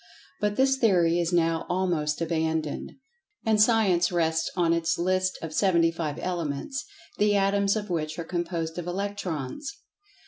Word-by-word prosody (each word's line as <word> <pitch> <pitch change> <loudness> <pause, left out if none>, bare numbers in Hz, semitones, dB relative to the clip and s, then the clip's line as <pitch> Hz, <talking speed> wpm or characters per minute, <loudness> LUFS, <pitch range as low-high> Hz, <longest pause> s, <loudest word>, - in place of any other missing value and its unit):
But 210 0 0
this 265 +2 +3
theory 175 -8 +3
is 170 0 0
now 165 -2 +1
almost 170 -5 0
abandoned, 160 -2 -1 0.5
and 220 -1 +3
Science 205 -7 +3
rests 165 -2 +1
on 170 -2 +2
its 170 0 0
list 185 +1 0
of 160 -1 -5
seventy 170 -3 +3
five 160 -3 -4
elements, 145 -6 -3 0.4
the 205 0 +3
atoms 200 +1 +2
of 210 -3 -4
which 155 -2 -2
are 170 - -3
composed 170 -1 -3
of 175 - -6
"Electrons." 195 - -4
175 Hz, 145 wpm, -26 LUFS, 165-195 Hz, 0.5 s, this